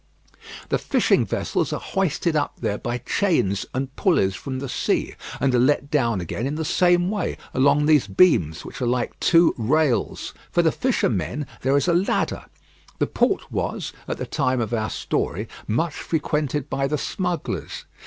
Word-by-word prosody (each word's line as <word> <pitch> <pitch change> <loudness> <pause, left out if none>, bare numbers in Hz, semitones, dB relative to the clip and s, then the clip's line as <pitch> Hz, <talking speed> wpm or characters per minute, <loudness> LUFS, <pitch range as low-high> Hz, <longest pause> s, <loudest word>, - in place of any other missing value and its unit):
The - - +1
fishing - - +2
vessels - - -1
are - - -2
hoisted 175 -3 -1
up 150 - 0
there 100 - -2
by 120 +1 -2
chains 125 - 0
and 135 +1 -4
pulleys 130 - +2
from 130 +7 -5
the 140 +1 -4
sea, - - -1 0.3
and 135 -2 +2
are 125 - +4
let 140 +2 +2
down 120 -9 +2
again 100 +8 -3
in 145 - -2
the 160 0 -2
same 175 +3 +3
way 210 - -2 0.2
along 140 +3 +3
these 150 -7 +4
beams, 95 - +3
which - - -8
are 125 - +1
like 125 +1 -1
two 170 -1 +5
rails. 135 +2 +1 0.2
For 175 - +3
the 160 - +4
fishermen 145 - 0 0.2
there 135 +2 +3
is 140 - +1
a 170 - +3
ladder. 180 +3 0 0.5
The - - +2
port - - 0
was, - - -3
at - - -3
the - - -4
time 130 -3 0
of 115 0 -2
our 110 -1 0
story, - - -2 0.2
much 150 +9 0
frequented 150 -3 -1
by 135 -1 -1
the 150 +2 -1
smugglers. 180 0 -3
140 Hz, 175 wpm, -23 LUFS, 120-160 Hz, 0.5 s, two